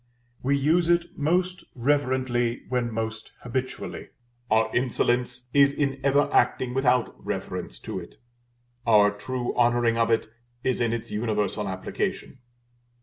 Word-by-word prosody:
We 140 Hz, +2 st, +2 dB
use 165 Hz, +5 st, +2 dB
it 170 Hz, 0 st, +1 dB
most 180 Hz, +4 st, 0 dB
reverently 130 Hz, -2 st, 0 dB
when 125 Hz, -2 st, 0 dB
most 110 Hz, 0 st, -4 dB
habitually: 130 Hz, +2 st, -4 dB, 0.4 s
our 110 Hz, 0 st, +2 dB
insolence 125 Hz, 0 st, 0 dB
is 140 Hz, 0 st, +6 dB
in 140 Hz, -2 st, -1 dB
ever 140 Hz, +1 st, +3 dB
acting 125 Hz, -1 st, +2 dB
without 125 Hz, -2 st, +1 dB
reference -, -, -4 dB
to -, -, -4 dB
it, -, -, -12 dB, 0.7 s
our 105 Hz, -2 st, +6 dB
true 125 Hz, +4 st, -4 dB
honoring 120 Hz, -1 st, +3 dB
of 115 Hz, -, +3 dB
it 115 Hz, -1 st, +2 dB, 0.4 s
is 130 Hz, -1 st, 0 dB
in 120 Hz, -1 st, +2 dB
its 115 Hz, 0 st, -4 dB
universal 105 Hz, -2 st, -1 dB
application. 95 Hz, +6 st, -4 dB
125 Hz, 130 wpm, -26 LUFS, 115-135 Hz, 0.7 s, is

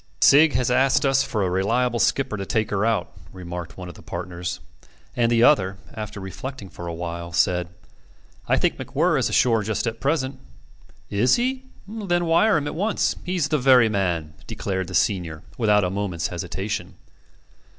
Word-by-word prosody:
"Sigg 150 Hz, +2 st, +6 dB
has 125 Hz, -1 st, +1 dB
asked 135 Hz, +2 st, +3 dB
us 135 Hz, -1 st, +3 dB
for 105 Hz, -3 st, -1 dB
a 95 Hz, -, 0 dB
reliable 115 Hz, +6 st, +1 dB
skipper 135 Hz, -3 st, +1 dB
to 100 Hz, -, -4 dB
take 110 Hz, +2 st, -1 dB
her 100 Hz, 0 st, 0 dB
out," 115 Hz, 0 st, 0 dB, 0.2 s
remarked 90 Hz, -2 st, -7 dB
one 90 Hz, -1 st, -7 dB
of 90 Hz, -, -8 dB
the -, -, -15 dB
partners; 90 Hz, -1 st, -5 dB, 0.6 s
and 120 Hz, -1 st, +2 dB
the 115 Hz, 0 st, +4 dB
other, 95 Hz, -9 st, +4 dB, 0.2 s
after 105 Hz, -2 st, -6 dB
reflecting 100 Hz, +4 st, -7 dB
for 85 Hz, -, -8 dB
a 85 Hz, -, -4 dB
while, 85 Hz, 0 st, -5 dB
said: 90 Hz, +1 st, +1 dB, 0.8 s
"I -, -, +3 dB
think -, -, +1 dB
MacWhirr -, -, +1 dB
is -, -, +1 dB
ashore 115 Hz, -3 st, +3 dB
just 110 Hz, +2 st, -2 dB
at 115 Hz, -1 st, -3 dB
present." 135 Hz, -1 st, -1 dB, 0.7 s
"Is 115 Hz, +6 st, +3 dB
he? 260 Hz, +2 st, -1 dB, 0.2 s
Then 195 Hz, -5 st, -1 dB
wire 170 Hz, +5 st, +4 dB
him 150 Hz, -, -2 dB
at 145 Hz, -, -3 dB
once. 205 Hz, +6 st, 0 dB
He's 175 Hz, -4 st, -1 dB
the 150 Hz, -, +1 dB
very 125 Hz, -3 st, +5 dB
man," 85 Hz, -7 st, -1 dB
declared 95 Hz, -2 st, -3 dB
the -, -, -6 dB
senior, 85 Hz, -8 st, 0 dB
without 105 Hz, -3 st, +3 dB
a 90 Hz, -, -1 dB
moment's 95 Hz, -4 st, -2 dB
hesitation. 95 Hz, +3 st, -4 dB
110 Hz, 175 wpm, -23 LUFS, 90-135 Hz, 0.8 s, Sigg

